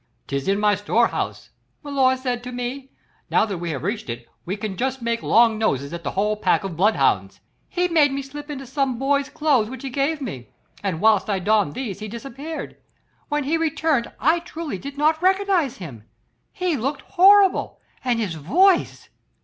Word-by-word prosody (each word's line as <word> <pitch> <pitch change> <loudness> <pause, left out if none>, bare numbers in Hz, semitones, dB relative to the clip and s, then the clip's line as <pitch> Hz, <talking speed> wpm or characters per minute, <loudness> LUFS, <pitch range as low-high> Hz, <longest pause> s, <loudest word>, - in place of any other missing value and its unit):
'This 140 -1 -3
is 195 +1 +2
my 210 0 +3
store 205 +4 +2
house,' - - -4 0.3
milor 270 -3 +2
said 250 -2 -3
to 250 - -6
me; 250 +2 -5 0.4
'now - - +3
that 195 -5 -4
we 170 0 -4
have 140 -5 -4
reached - - -3
it 120 0 -6 0.2
we 195 +4 -2
can 205 -2 -4
just 260 +5 -2
make 235 -1 -1
long 225 -1 +4
noses 140 - 0
at 170 0 -6
the 140 - -2
whole 210 +2 +1
pack 210 - +1
of 190 -4 -5
bloodhounds.' 205 +6 +2 0.3
He 360 0 0
made 310 -5 +4
me 275 0 -3
slip 290 +2 -9
into 270 -2 -6
some 270 -1 -1
boy's 280 +2 +1
clothes 275 -8 +1
which 260 0 -8
he 270 - -4
gave 280 +4 0
me, 160 - -6 0.3
and 185 -5 -2
whilst 215 -1 +4
I 200 - +1
donned 205 -4 +1
these 210 -8 -4
he 215 - -6
disappeared. 275 +8 -7 0.5
When 295 -1 0
he 305 +5 +1
returned 315 -5 0
I 320 +4 +3
truly 330 - -6
did 280 +5 -8
not 310 +2 +2
recognise 375 -7 +2
him. 125 - -9 0.5
He 365 -4 -1
looked 275 +3 -2
horrible, 395 +1 +4 0.2
and 245 -2 +1
his 205 -7 -2
voice 340 - +2
255 Hz, 190 wpm, -22 LUFS, 205-295 Hz, 0.5 s, long